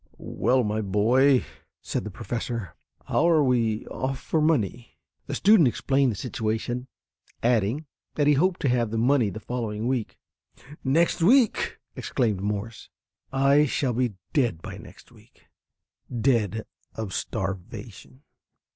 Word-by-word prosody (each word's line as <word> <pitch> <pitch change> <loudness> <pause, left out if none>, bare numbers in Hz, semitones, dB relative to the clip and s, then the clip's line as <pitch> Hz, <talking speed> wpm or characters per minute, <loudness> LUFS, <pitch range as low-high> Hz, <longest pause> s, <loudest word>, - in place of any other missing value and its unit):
"Well, 125 +7 +1
my 105 0 -1
boy," 120 +7 +3 0.4
said - - -3
the - - -4
professor, 115 -5 -4 0.3
"how 170 - +2
are 160 -3 +4
we 115 -4 +1
off 130 0 -3
for 160 - -1
money?" 125 - 0 0.3
The - - -3
student 200 -7 +5
explained 135 +2 +1
the - - -5
situation, 115 +3 -3 0.6
adding 120 +5 +1 0.3
that 145 - +2
he 150 - +5
hoped 175 +6 +1
to 140 - +1
have 120 -2 +1
the 115 - -3
money 120 -1 +3
the 110 - -7
following 110 -2 -4
week. 125 -3 -2 0.7
"Next 165 +6 +2
week!" 235 +6 +3 0.2
exclaimed 110 -6 -1
Morse. 105 +2 -4 0.4
"I 140 +2 +4
shall 130 -1 0
be 120 -3 0 0.2
dead 120 - +1
by - - -7
next - - -15
week - - -22 0.7
dead 115 -3 0 0.3
of 110 -4 -5
starvation." 95 +5 -5
120 Hz, 135 wpm, -25 LUFS, 110-135 Hz, 0.7 s, student